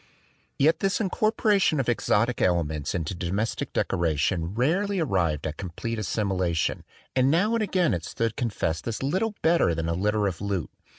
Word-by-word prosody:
Yet 155 +4 +3
this 195 0 +1
incorporation 210 - +2
of 130 - -1
exotic 120 0 +1
elements 80 -4 0
into 85 0 -2
domestic 95 +5 -2
decoration 85 +2 0
rarely 185 - +1
arrived 90 - 0
at 80 0 -4
complete 105 +5 -4
assimilation; 95 -6 -1 0.3
and 130 0 +4
now 190 +9 +2
and 230 - +1
again 185 -5 +1
it 85 -2 -2
stood 115 +4 -2
con 120 - -1
fessed 85 -4 -2
as 115 +2 -3
little 195 +10 0
better 160 - +3
than 80 0 -2
a 85 - 0
litter 105 +4 +1
of 95 -3 -2
loot. 100 -5 -2
105 Hz, 165 wpm, -26 LUFS, -, 0.3 s, and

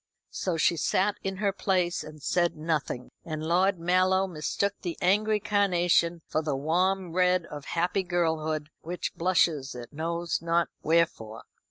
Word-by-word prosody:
So 180 -3 -2
she 170 +1 +3
sat 195 +6 +1
in 195 -1 -3
her 200 -1 0
place 185 -3 0
and 155 -2 -12
said 175 -1 +1
nothing; 155 -5 -2
and 155 -1 -5
Lord 185 +3 +2
Mallow 185 +2 +2
mistook 190 +3 -1
the 175 -3 -4
angry 210 +3 +2
carnation 175 -5 +2
for 155 - -1
the 150 -3 -1
warm 180 +5 0
red 180 -1 +3
of 150 -3 -9
happy 175 +3 0
girlhood, 160 -4 -1
which 175 +2 -4
blushes 165 -6 +1
it 120 +1 -9
knows 170 +2 -2
not 170 0 +1
wherefore. 155 -9 0
170 Hz, 150 wpm, -28 LUFS, 155-185 Hz, -, she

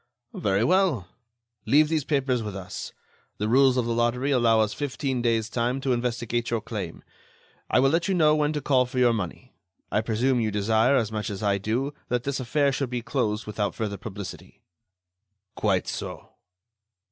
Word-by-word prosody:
"Very 100 0 +1
well. 170 - +2 0.6
Leave 150 +2 +5
these 155 -2 0
papers 135 -4 +1
with 105 -3 -5
us. 95 -2 -6 0.5
The 105 - -1
rules 130 +2 +4
of 125 - +1
the 115 - 0
lottery 120 +4 +1
allow 115 -4 +4
us 105 -1 0
fifteen 135 -2 -2
days' 115 -2 +1
time 120 +3 -1
to 130 -1 +1
investigate 120 -1 -1
your 115 - 0
claim. 105 -6 -6 0.7
I - - +4
will 135 +1 +4
let 165 +2 +1
you 195 - +1
know 155 -3 +4
when 150 -1 +1
to 150 - -2
call 130 -2 +3
for 125 - -7
your 125 -2 +4
money. 110 +4 -5 0.4
I 105 - +2
presume 120 +3 +1
you 110 -2 +1
desire, 110 +5 +2
as 115 -5 +1
much 105 -1 -3
as 100 0 -5
I 100 -1 +2
do, 120 +8 -1
that 125 0 -1
this 140 0 -2
affair 140 +3 +1
should 135 -1 -2
be 120 -1 -3
closed 115 -5 -1
without 105 -1 -2
further 105 -3 -3
publicity." 100 -1 -9 0.9
"Quite - - 0
so." - - -6
120 Hz, 180 wpm, -26 LUFS, 110-135 Hz, 0.9 s, Leave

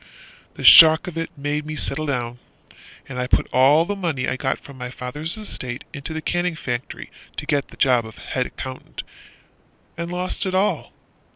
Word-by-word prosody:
The - - -8
shock 160 -1 +9
of 180 - -6
it 165 0 -3
made 145 +1 -2
me 155 +1 -6
settle 155 +1 -1
down 120 -3 -3 0.7
And 125 -2 -6
I 125 - -1
put - - +2
all 140 +6 +5
the 205 - -3
money 165 -9 -2
I - - -1
got 130 0 -1
from 140 - -13
my 125 0 -5
father's 145 - -5
estate 130 - -5
Into 140 +2 -7
the 160 0 -5
canning 175 -1 -1
factory, 125 -4 -5 0.3
to - - -3
get 140 -1 0
the - - -16
job 125 -4 +3
Of 110 - -13
head 130 -1 -3
accountant, 130 0 -8 0.9
and 170 +1 -5
lost 180 +2 -3
it 185 - -2
all. 195 +2 0
145 Hz, 185 wpm, -22 LUFS, 130-165 Hz, 0.9 s, shock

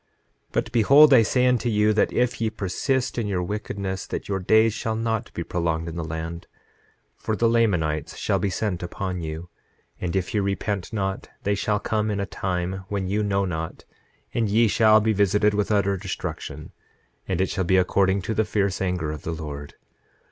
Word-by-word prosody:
9:18 - - -40
But 110 - -1
behold, 140 +6 +7
I 125 - +8
say 125 +3 +2
unto 125 -1 +2
you 105 -1 +3
that 105 - +2
if 125 -1 0
ye 110 - +2
persist 120 +6 -1
in 110 - -1
your 95 -3 -1
wickedness 100 -1 -4
that - - -5
your 95 -1 -1
days 110 +4 +4
shall 110 0 -2
not 115 0 -2
be 85 - -2
prolonged 85 -1 -1
in 85 - -6
the 85 - -3
land, 80 +1 -5 0.7
for 110 - -3
the 115 - +2
Lamanites 90 -10 +1
shall - - 0
be 100 - 0
sent 95 -2 -2
upon 90 0 -4
you; 80 +2 -6 0.5
and 90 -1 -3
if 95 -1 -1
ye 105 - +2
repent 100 -1 -2
not 95 -3 -3
they 100 - +1
shall 105 +1 0
come 110 0 -1
in 105 -1 -1
a 100 - -1
time 95 0 -3
when 100 -2 -2
you 100 +3 0
know 100 -1 +1
not, 80 -3 -5 0.5
and 115 -3 0
ye 115 +3 +4
shall 110 0 +5
be 110 +1 +2
visited 105 +1 +3
with 105 0 0
utter 100 -1 +2
destruction; 95 -1 -6 0.6
and 95 -2 -1
it 95 - +1
shall 95 - -1
be 95 +2 +3
according 95 +1 +2
to 110 - -2
the 110 - +2
fierce 100 -3 -1
anger 90 -5 -1
of 75 -2 -6
the 85 - -4
Lord. 75 -2 -7
100 Hz, 200 wpm, -24 LUFS, 90-110 Hz, 0.7 s, I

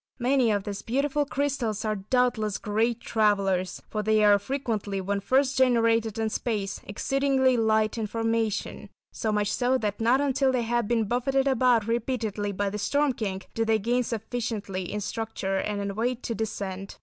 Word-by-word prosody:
Many 255 -1 +2
of 205 -2 +1
these 200 -1 -5
beautiful 280 +4 0
crystals 255 -7 -1
are 215 -1 0
doubtless 215 0 0
great 225 +2 0
travellers, 195 -4 +1
for 215 - -3
they 215 0 +3
are 205 -1 +6
frequently, 210 -4 -3
when 200 +1 -1
first 265 +5 +2
generated 230 -3 +3
in 220 -1 -1
space, 205 -5 -2
exceedingly 265 +4 +1
light 220 -1 +2
in 215 - -1
formation, 225 -1 -2 0.2
so 220 - -2
much 210 -1 0
so 255 +1 +2
that 210 -3 -3
not 240 +4 +4
until 270 -1 +2
they 250 -2 0
have 235 -1 0
been 230 -1 +2
buffeted 265 +4 +1
about 250 -4 +3
repeatedly 230 -3 -2
by 200 0 -2
the 210 - -4
Storm 285 +5 +1
King, 195 -5 -4
do 225 - 0
they 225 0 +2
gain 240 +4 +1
sufficiently 220 -5 -4
in 210 - -3
structure 205 -2 -3
and 205 +1 -2
in 200 0 -3
weight 240 +4 -2
to 230 - -2
descend. 195 -3 -4
225 Hz, 175 wpm, -26 LUFS, 205-250 Hz, 0.2 s, are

